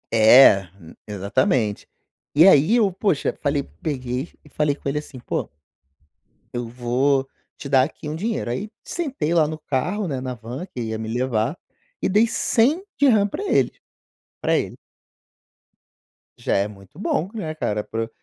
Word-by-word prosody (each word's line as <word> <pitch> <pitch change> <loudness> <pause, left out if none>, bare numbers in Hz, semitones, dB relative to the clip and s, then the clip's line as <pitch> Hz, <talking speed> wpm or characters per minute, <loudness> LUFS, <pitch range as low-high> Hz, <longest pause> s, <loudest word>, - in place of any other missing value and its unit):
É, 110 -3 +7
hum, 80 -4 -14
exatamente. 105 +2 0 0.5
E 160 +4 +7
aí 180 +3 +6
eu, 215 -5 +3
poxa, 185 -4 0
falei 145 -1 0 0.2
peguei 130 -1 -3
e 150 - -18
falei 145 0 0
com 140 - -5
ele 145 - -2
assim: 145 -3 -10
"Pô, - - -3 1.0
eu 120 -1 -3
vou 130 +3 0 0.3
te 140 - -8
dar, 135 -2 +5
aqui, 150 +1 -8
um 155 - -3
dinheiro", 215 - -2
aí 160 - -3 0.2
sentei 280 - -2
lá 165 -3 +4
no 155 +1 -4
carro, 175 +7 -2
né, 135 -4 -3
na 130 -1 -4
van 120 +9 -7
que 155 -10 -8
ia 110 -1 -3
me 110 0 -5
levar, 120 +3 -1 0.5
e - - +2
dei 210 +4 +4
DH100 265 - +2
pra 205 - -3
ele, - - +2 0.7
pra - - +2
ele. - - -4 1.6
Já 120 - -1
é 100 +1 +1
muito 105 +7 -15
bom, 185 -3 -1
né, 165 -9 -4
cara, 105 -8 -2
pro 115 +1 -4
140 Hz, 160 wpm, -22 LUFS, 120-180 Hz, 1.6 s, É